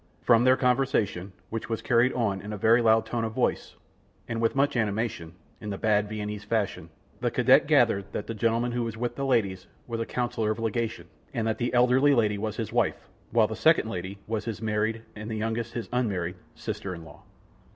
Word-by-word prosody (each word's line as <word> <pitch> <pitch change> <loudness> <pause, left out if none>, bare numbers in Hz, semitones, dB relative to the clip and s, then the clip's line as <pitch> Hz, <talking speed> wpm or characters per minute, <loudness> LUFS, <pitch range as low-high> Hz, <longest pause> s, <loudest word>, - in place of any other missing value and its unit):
From 120 -1 +5
their 130 +1 +5
conversation, 120 -7 +1 0.2
which 115 +1 -4
was 115 - -3
carried 120 +1 +3
on 105 -6 -1
in 105 - -7
a - - -4
very 115 +4 +4
loud 110 -1 +4
tone 115 0 -2
of 110 -1 -3
voice, - - -1 0.5
and 115 -1 -3
with 115 - +1
much 140 0 +2
animation, 105 -6 -1 0.3
in 105 - -6
the 100 - -3
bad, 105 -1 +1
Viennese 105 -1 -4
fashion, 105 -6 -2 0.3
the - - 0
cadet - - +4
gathered 100 0 +3
that 105 - -4
the 115 - -4
gentleman 115 +2 +1
who 120 0 -1
was 115 -2 -3
with 120 +1 -2
the 140 +1 -2
ladies, 100 -8 0 0.2
was 115 -1 -4
a 115 - -1
Councilor 120 -3 -1
of 110 - -1
Legation, 115 0 -2 0.3
and 115 - 0
that 110 - -1
the 120 - 0
eldest 125 +1 +4
lady 115 -8 +3
was 110 -1 -3
his - - -4
wife, - - 0 0.2
while - - +4
the - - -4
second - - +3
lady 95 +3 -5
was 110 -1 -3
his 115 -3 -4
married, 110 +1 -1
and 110 +1 -7
the 110 - -3
youngest 115 +1 -2
his 115 -5 -3
unmarried, 95 -8 0 0.2
sister 95 -2 -5
in 85 -1 -10
law. 75 - -14
110 Hz, 210 wpm, -27 LUFS, 105-120 Hz, 0.5 s, From